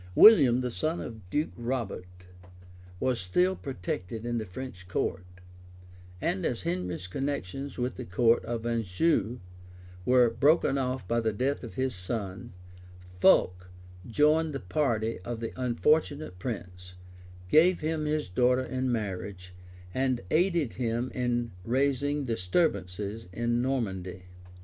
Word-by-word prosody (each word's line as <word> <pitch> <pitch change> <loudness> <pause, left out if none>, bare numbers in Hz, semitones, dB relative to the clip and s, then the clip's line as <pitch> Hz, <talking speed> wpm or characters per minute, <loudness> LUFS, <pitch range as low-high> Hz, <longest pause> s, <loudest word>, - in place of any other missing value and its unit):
William, 135 - +8
the 125 -1 -2
son 155 +7 -1
of 110 -6 -8
Duke 150 - 0
Robert, 120 -6 -3 0.9
was 125 +1 +1
still 180 - +2
protected 110 - -5
in 120 -1 -1
the 110 - -5
French 95 -1 -8
court; 90 0 -2 0.9
and 95 - -1
as 120 - -1
Henry's 90 +1 -3
connections 135 +3 -4
with 125 +1 -2
the 125 - -5
count 115 +5 +3
of 115 0 -4
Anjou 115 - +1 0.6
were 125 +2 +5
broken 140 +2 +3
off 130 0 -2
by 115 0 +1
the 110 -1 +1
death 130 +7 -1
of 115 - -8
his 130 0 0
son, 95 +3 -5 0.7
Fulk 90 +1 +4 0.4
joined 150 +5 +3
the - - -2
party 115 -1 0
of 115 +5 -5
the 115 -1 -4
unfortunate 130 - +1
prince, 90 -5 -6 0.5
gave 170 - +5
him 155 0 -1
his 150 0 0
daughter 125 +6 +2
in 130 +1 -1
marriage, 95 -4 -4 0.4
and 130 0 0
aided 170 - +2
him 120 0 -2
in 120 -2 -1
raising 140 +4 +1
disturbances 100 - -1
in 120 +3 0
Normandy. 95 -9 -2
120 Hz, 130 wpm, -29 LUFS, 95-135 Hz, 0.9 s, William